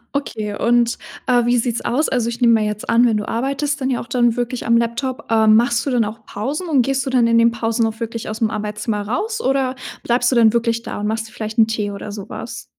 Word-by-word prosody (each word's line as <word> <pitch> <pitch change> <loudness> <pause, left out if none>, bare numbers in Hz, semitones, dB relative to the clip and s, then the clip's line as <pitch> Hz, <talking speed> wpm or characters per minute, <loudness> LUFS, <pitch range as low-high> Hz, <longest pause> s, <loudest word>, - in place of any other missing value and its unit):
Okay 215 -7 -3
und, 235 0 +2 0.3
äh, 245 -2 +3
wie 245 +1 +3
sieht 235 -1 0
es - - -4
aus? 295 +6 +1
Also, 240 -3 0
ich 235 0 -6
nehme 235 -2 +5
mal 220 -1 +3
jetzt 210 0 -4
an, 235 +1 +5
wenn 225 -3 +2
du 210 - -4
arbeitest, 275 +4 -2
dann 260 - 0
ja 250 - 0
auch - - -7
dann 240 -2 +1
wirklich 245 0 -3
am 235 0 +4
Laptop, 245 +4 -2
ähm, 220 -1 +5
machst 235 0 +1
du - - -1
dann 240 -3 +2
auch 215 +1 -8
Pausen 285 - -4
und 275 -5 +3
gehst 270 +2 -1
du - - -2
dann 250 -3 +3
in 230 0 +3
den 230 0 +5
Pausen 230 0 0
auch 225 0 -4
wirklich 230 -1 -5
aus 215 +1 -5
dem 225 - +1
Arbeitszimmer 210 0 -3
raus 435 - -2
oder 265 - 0 0.3
bleibst 245 +1 +2
du - - +1
dann 225 -2 +5
wirklich 230 -1 0
da - - -5
und 210 - -1
machst 225 +1 -2
dir 220 - -17
vielleicht 215 +1 -6
'n 225 -1 +5
Tee 215 -2 -2
oder 200 +1 -7
sowas? 200 -2 -7
235 Hz, 265 wpm, -19 LUFS, 220-250 Hz, 0.3 s, nehme